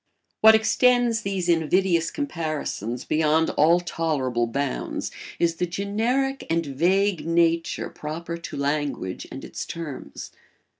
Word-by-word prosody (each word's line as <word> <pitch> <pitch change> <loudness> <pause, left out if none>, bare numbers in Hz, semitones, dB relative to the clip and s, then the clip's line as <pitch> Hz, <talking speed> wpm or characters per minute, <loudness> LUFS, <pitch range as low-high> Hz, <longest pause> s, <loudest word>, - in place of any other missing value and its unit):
What 220 0 +8
extends 240 +1 +3
these 195 -4 -2
invidious 170 0 +2
comparisons 155 - -3
beyond 160 +1 +2
all 165 +4 +4
tolerable 140 -9 -1
bounds 115 - -3 0.3
is 165 -1 +1
the 180 - 0
generic 230 +9 -1
and 165 0 +1
vague 175 +6 +1
nature 165 0 +1
proper 165 +3 -5
to 170 - -7
language 140 -9 -2
and - - -7
its - - -6
terms. 145 - -7
165 Hz, 115 wpm, -24 LUFS, 150-195 Hz, 0.3 s, What